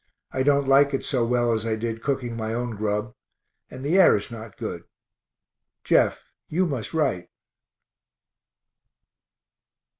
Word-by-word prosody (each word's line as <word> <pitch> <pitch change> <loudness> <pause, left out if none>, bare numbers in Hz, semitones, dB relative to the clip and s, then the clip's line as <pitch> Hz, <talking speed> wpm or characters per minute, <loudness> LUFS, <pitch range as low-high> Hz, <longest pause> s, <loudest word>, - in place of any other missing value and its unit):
I 130 - -1
don't 140 0 +3
like 140 +1 +5
it - - -4
so 130 -4 0
well 120 0 +1
as 110 -1 -1
I 115 -1 -1
did 115 0 -4
cooking 130 -4 -2
my 110 0 -3
own 120 0 -2
grub 105 +1 -2 0.6
and 130 +2 -8
the 170 +7 +3
air 185 - +7
is 100 - -7
not 110 -2 -9
good. - - -5 1.0
Jeff, - - +2 0.2
you 180 +4 +1
must 135 -9 -3
write. 135 - 0
120 Hz, 140 wpm, -24 LUFS, 110-140 Hz, 1.0 s, air